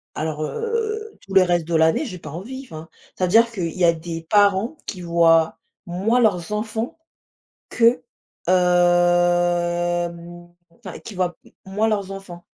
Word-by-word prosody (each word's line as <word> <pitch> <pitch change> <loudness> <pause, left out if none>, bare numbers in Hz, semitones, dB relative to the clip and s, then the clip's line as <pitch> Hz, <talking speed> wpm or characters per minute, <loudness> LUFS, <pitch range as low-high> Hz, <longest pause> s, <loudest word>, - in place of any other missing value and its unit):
Alors, 155 0 -3
heu, 445 - -3
tout 195 - -11
le 190 - +7
reste 175 -3 +1
de 170 - -1
l'année, 160 - +3
j'ai 185 -7 -7
pas 155 - -9
envie. 240 - -7
Enfin, 160 -5 -10 0.3
c'est-à-dire 225 +6 +3
qu'il 175 -7 -3
y 180 - 0
a 170 - +6
des 165 0 -7
parents 205 +7 +3
qui 185 - -6
voient 165 -1 +3 0.3
moins 195 +8 0
leurs 200 -3 +1
enfants 220 +4 -3 0.7
que, 235 +1 +3 0.5
hem, 175 -1 +1 0.2
enfin, 185 -1 -10
qui 220 - -10
voient 180 -1 -1 0.3
moins 205 +3 0
leurs 200 -3 -1
enfants. 185 -3 -9
180 Hz, 145 wpm, -22 LUFS, 175-215 Hz, 0.7 s, le